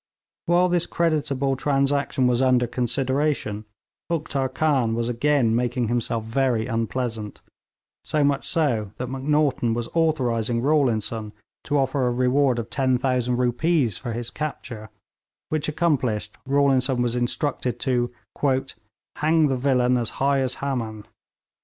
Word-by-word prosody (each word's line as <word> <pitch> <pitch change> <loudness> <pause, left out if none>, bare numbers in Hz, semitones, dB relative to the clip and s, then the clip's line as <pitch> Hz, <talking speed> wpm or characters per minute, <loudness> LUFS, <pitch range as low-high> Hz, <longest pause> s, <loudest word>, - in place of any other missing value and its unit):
While 175 +2 +4
this 175 -1 +1
creditable 145 -5 0
transaction 140 0 +1
was 125 0 +2
under 130 -2 +3
consideration, 130 -2 -1 0.4
Uktar 145 -5 -1
Khan 130 -6 +1
was 115 0 -1
again 120 -1 +2
making 120 -1 0
himself 115 -1 -1
very 115 0 0
unpleasant; 115 -2 -3 0.6
so 150 -1 0
much 140 -1 +1
so 120 - 0
that 125 0 -4
Macnaghten 135 -3 +1
was 120 0 -3
authorising 125 -8 +1
Rawlinson 115 -7 0 0.3
to 145 - +1
offer 135 -1 +1
a - - +1
reward 130 +1 +2
of 115 0 -5
10,000 125 -2 +1
rupees 125 - +1
for 120 -3 -4
his 120 +1 -5
capture, 120 -8 -6 0.6
which 155 -1 -1
accomplished, 130 -10 0
Rawlinson 135 -2 +2
was 120 0 -1
instructed 125 0 -1
to 120 -2 0 1.1
'hang 155 0 +3
the 135 - +1
villain 125 -1 +2
as 120 -2 0
high 140 0 +2
as 130 -2 0
Haman.' 115 -6 -4
130 Hz, 130 wpm, -24 LUFS, 120-145 Hz, 1.1 s, While